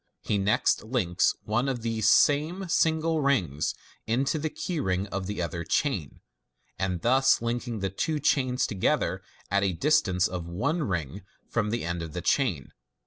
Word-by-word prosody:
He 105 - 0
next 100 +2 +2
links 105 -6 +1
one 120 +6 0
of 120 -4 -3
these 110 -3 +1
same 160 +7 +3
single 160 -1 +2
rings 95 - 0 0.3
into 135 +7 +1
the 155 +1 -1
key 170 +1 -4
ring 95 -6 0
of 95 -1 -4
the 100 -3 -3
other 85 0 -4
chain, 90 - -1 0.6
thus 120 +9 +3
linking 115 -1 -3
the 95 - -1
two 150 +10 -1
chains 130 -3 +1
together 100 -4 0 0.3
at 100 0 +3
a 100 -2 +1
distance 100 - +2
of 90 -3 -5
one 140 - -1
ring 90 - -3 0.3
from 110 -2 -1
the 115 -2 -2
end 85 0 -3
of 80 -2 -6
the 90 - -4
chain. 90 - 0
110 Hz, 160 wpm, -27 LUFS, 90-140 Hz, 0.6 s, same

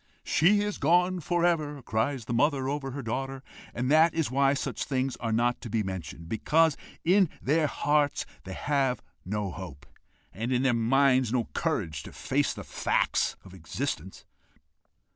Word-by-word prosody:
'She 205 +6 +4
is 205 -1 -2
gone 180 +4 +3
for 175 +2 0
ever!' 155 -4 0
cries 115 +2 -1
the 120 - -3
mother 135 +1 +2
over 140 -1 -2
her 135 +1 -6
daughter. 135 +3 -3 0.3
And 125 +3 -2
that 160 +2 +5
is 160 -7 0
why 140 +1 +3
such - - -3
things 130 -1 -1
are 115 -1 -3
not 120 +2 +1
to 120 - -7
be 110 0 0
mentioned, 85 -4 -6
because 155 - +2 0.3
in 185 0 +4
their 155 +3 +2
hearts 145 0 +1 0.2
they 95 - -7
have 135 -3 0 0.2
no 100 0 -2
hope, 75 -6 -9 0.5
and 115 +5 -3
in 125 0 +2
their 130 -2 +3
minds 130 +1 +3
no 120 -2 0
courage 75 -4 -1
to - - -11
face - - 0
the - - -7
facts - - 0
of 95 - -13
existence. 95 - -5
135 Hz, 165 wpm, -28 LUFS, 115-150 Hz, 0.5 s, that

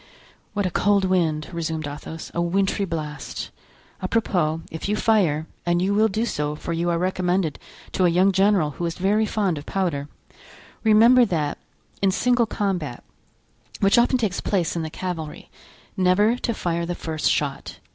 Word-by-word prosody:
"What 205 - 0
a 185 - -1
cold 200 +1 +2
wind!" 165 -5 +1
resumed 160 -2 -3
Athos; 150 +2 -8
"a 170 - 0
wintry 195 +3 +1
blast. 150 -6 -5 0.5
Apropos, 180 -6 0
if 160 +5 -5
you 210 - +2
fire—and 175 -5 +1
you 190 +3 +1
will 215 +2 +4
do 220 +3 -1
so, 150 -8 -2
for 165 +2 -4
you 170 +1 0
are 170 - +1
recommended 180 -2 0 0.3
to 185 - +2
a - - +5
young 185 +3 +4
general 190 -5 +3
who 170 +5 -4
is 165 - -4
very 210 +4 +2
fond 195 -7 0
of 145 - -12
powder—remember 215 - +1
that 155 -7 -2 0.4
in 195 - +4
single 245 +4 +2
combat, 180 - -2 0.8
which 200 +4 +4
often 250 +2 +3
takes 215 -6 -1
place 180 -6 0
in 170 - -1
the 160 - -4
cavalry, 165 -2 -6 0.4
never 190 +5 +3
to 245 -1 -2
fire 170 -2 -2
the 175 - -2
first 160 -2 -1
shot. 140 -2 -2
180 Hz, 160 wpm, -23 LUFS, 160-200 Hz, 0.8 s, a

